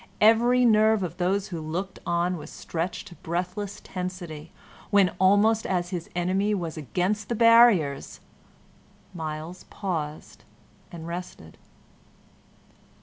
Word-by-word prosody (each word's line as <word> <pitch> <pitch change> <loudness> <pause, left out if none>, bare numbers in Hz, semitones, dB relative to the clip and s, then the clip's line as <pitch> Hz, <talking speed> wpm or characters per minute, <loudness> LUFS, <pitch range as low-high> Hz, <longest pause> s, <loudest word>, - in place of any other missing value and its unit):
Every 240 +3 +5
nerve 215 -2 +4
of 175 -1 -5
those 190 +2 0
who 170 -3 -5
looked 180 +5 -4
on 175 +1 +1
was 165 - -8
stretched 175 +4 -5
to 175 - -13
breathless 180 +4 -4
tensity, 180 -4 -6 0.4
when, 200 -2 +4
almost 205 +4 +4
as 175 -2 -1
his 175 -3 -5
enemy 190 +4 +1
was 170 -4 -4
against 180 - -2
the 235 - 0
barriers, 230 - +4 0.9
Myles 160 +1 -6
paused 160 -6 -5 0.5
and 165 -2 -8
rested. 170 - -8
180 Hz, 115 wpm, -26 LUFS, 170-205 Hz, 0.9 s, Every